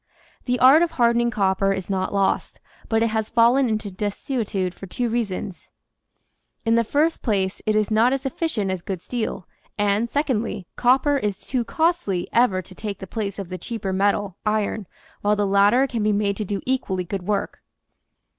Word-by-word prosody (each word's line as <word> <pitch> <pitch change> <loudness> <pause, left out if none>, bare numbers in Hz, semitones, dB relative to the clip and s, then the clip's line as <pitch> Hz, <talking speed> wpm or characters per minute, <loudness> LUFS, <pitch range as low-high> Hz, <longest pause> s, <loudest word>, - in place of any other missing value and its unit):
The 250 -1 +1
art 265 +5 +7
of 340 -1 +1
hardening 235 -3 +3
copper 195 -2 +1
is 190 -2 -5
not 190 -1 -1
lost, 195 -1 0 0.3
but 225 0 +2
it 230 - +2
has 220 0 -1
fallen 240 +3 +4
into 215 -2 -2
desuetude 205 -1 -2
for 195 - -10
two 240 +6 -2
reasons: 205 -5 -3 1.0
In 225 - +3
the 230 0 +4
first 300 +8 +1
place 195 -4 -1
it 215 - +2
is 215 0 +1
not 225 +3 +4
as 270 +1 -2
efficient 260 - -1
as 185 -2 -3
good 185 -1 -5
steel, 225 -7 -4 0.3
and, 205 +3 +1
secondly, 235 - -1
copper 270 +4 +3
is 205 -5 -2
too 250 -2 -2
costly 315 - 0
ever 205 -6 +3
to 185 - -13
take 205 0 -5
the 190 - -8
place 200 0 -4
of 195 -4 -6
the 185 0 -5
cheaper 215 -5 -4
metal, 200 0 0
iron, 210 -2 -1 0.3
while 205 +1 +2
the 205 0 +1
latter 200 +6 +4
can 240 -4 -3
be 210 0 +2
made 200 -1 +1
to 215 - -3
do 200 +1 -3
equally 210 -8 -1
good 180 +1 -5
work. 205 -1 -2
210 Hz, 185 wpm, -23 LUFS, 195-240 Hz, 1.0 s, art